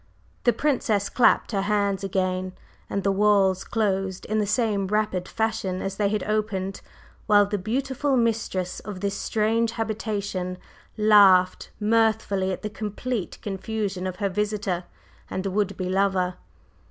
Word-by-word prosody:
The 240 - +6
Princess 225 -9 0
clapped 245 - +3
her 200 -3 0
hands 200 -1 0
again, 185 -1 -1 0.4
and 200 - -2
the 195 - +2
walls 195 -2 +3
closed 195 -4 -1
in 215 0 0
the 210 - 0
same 210 -2 +1
rapid 210 -3 0
fashion 220 -4 -1
as 195 0 -4
they 205 -1 +2
had 215 0 -1
opened, 210 -3 -2 0.5
while 205 -2 +6
the 205 0 -2
beautiful 265 +6 0
mistress 220 -6 -1
of 200 -3 -8
this 200 -1 -1
strange 225 +1 0
habitation 205 -5 -3 0.4
laughed 200 -4 +5
mirthfully 215 -3 +2
at 185 - -5
the - - -1
complete 215 +1 -4
confusion 195 -1 -3
of 185 - -4
her 200 +1 -1
visitor 200 -3 -2 0.4
and 190 - -3
would 200 0 -1
be 185 - -2
lover. 185 -1 +1
205 Hz, 140 wpm, -25 LUFS, 190-215 Hz, 0.5 s, The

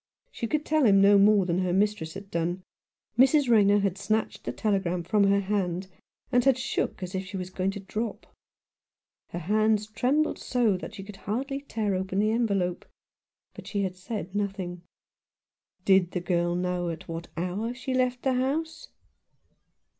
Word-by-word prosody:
She 230 - -4
could 305 +4 -1
tell 310 -1 +2
him 195 -1 +6
no 200 +1 +6
more 205 -1 +5
than 175 0 0
her 185 -1 0
mistress 195 -4 0
had 195 0 -9
done. 175 +2 -2 0.6
Mrs. 270 +2 +5
Rayner 205 -3 +5
had 195 -1 -1
snatched 215 +2 -1
the - - -2
telegram 190 -4 -1
from 205 +3 +3
her 200 0 +3
hand, 190 -2 -2 0.4
and 245 -1 +4
had 270 -1 +4
shook 250 -6 -2
as 180 - -6
if 190 0 -2
she 190 +1 -7
was 185 0 -5
going 185 +1 -1
to 200 +1 -4
drop. 215 +3 -4 1.0
Her - - -6
hands 215 +4 +2
trembled 255 +8 0
so 235 -6 +1
that 185 +4 -7
she 195 - -7
could 200 0 -10
hardly 270 +8 -3
tear 220 -7 -2
open 190 +1 -2
the 215 +2 +3
envelope; 200 -6 0 0.7
but - - -11
she 200 -2 -1
had 185 -1 -3
said 190 -1 -6
nothing. 195 -4 -3 1.0
"Did 190 -2 +4
the 180 - 0
girl 175 -1 0
know 180 -1 -1
at 165 -1 -7
what 165 0 -6
hour 185 +7 -2
she 260 +1 -4
left 255 -1 0
the 265 - +2
house 315 +5 -2
200 Hz, 175 wpm, -27 LUFS, 185-225 Hz, 1.0 s, him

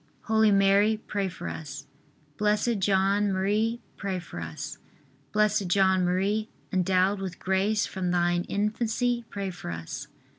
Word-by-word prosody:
Holy 220 -1 +4
Mary, 200 +2 +4
pray 200 -2 -1
for - - -7
us. 145 -2 -6 0.5
Blessed 210 +3 +1
John 195 +1 +2
Marie, 210 +5 0 0.2
pray 195 -2 -2
for 175 - -7
us. 80 -2 -6 0.5
B. 215 0 +4 0.2
J. 190 +3 +2
M., 190 +3 +2 0.3
endowed 185 +2 +2
with 185 -2 -5
grace 195 +3 +1
from 185 -2 -3
thine 175 0 +2
infancy, 230 +3 0
pray 200 -2 -4
for 175 - -8
us. 80 -1 -6
195 Hz, 135 wpm, -27 LUFS, 185-210 Hz, 0.5 s, Holy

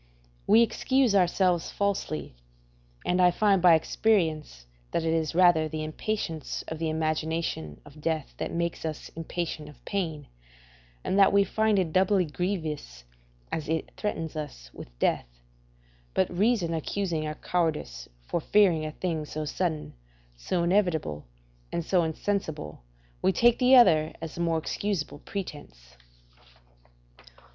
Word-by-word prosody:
We 225 +3 +7
excuse 260 0 +2
ourselves 180 -2 +2
falsely: 195 - -2 0.7
and 180 +1 +2
I 180 - +7
find 195 +1 +3
by 175 -2 +7
experience 160 - 0 0.2
that 165 - -1
it 165 0 +1
is 160 -1 -1
rather 175 -3 +5
the 155 0 -4
impatience 160 0 -3
of 160 - -5
the 160 -1 -1
imagination 155 - -2
of 145 +1 -14
death 160 -2 -2
that - - -3
makes 170 0 -2
us 155 -2 -5
impatient 165 -2 -5
of 150 - -17
pain, 160 -7 -3 0.8
and 195 - +1
that 195 - +7
we 200 0 +5
find 215 +2 +1
it 175 -5 0
doubly 190 0 +3
grievous 155 - -4 0.5
as 155 -2 -3
it 160 0 -2
threatens 165 -7 -3
us 135 - -7
with - - -10
death. - - +1 0.9
But 95 - +1
reason 200 -4 +2
accusing 165 -1 -2
our 155 - -4
cowardice 155 - -2 0.2
for 170 - -1
fearing 180 -4 +3
a 155 0 -4
thing 160 -4 -2
so 155 +1 -5
sudden, 160 0 -2 0.4
so 170 - -1
inevitable, 170 - +1 0.5
and 170 - -2
so 180 -1 +3
insensible, 160 - -3 0.4
we - - +3
take 235 +5 +4
the 255 +1 +6
other 160 -11 +6
as 165 -1 -6
the 170 - -5
more 165 -1 +1
excusable 160 -2 -3
pretence. 145 - -8
165 Hz, 140 wpm, -27 LUFS, 155-190 Hz, 0.9 s, We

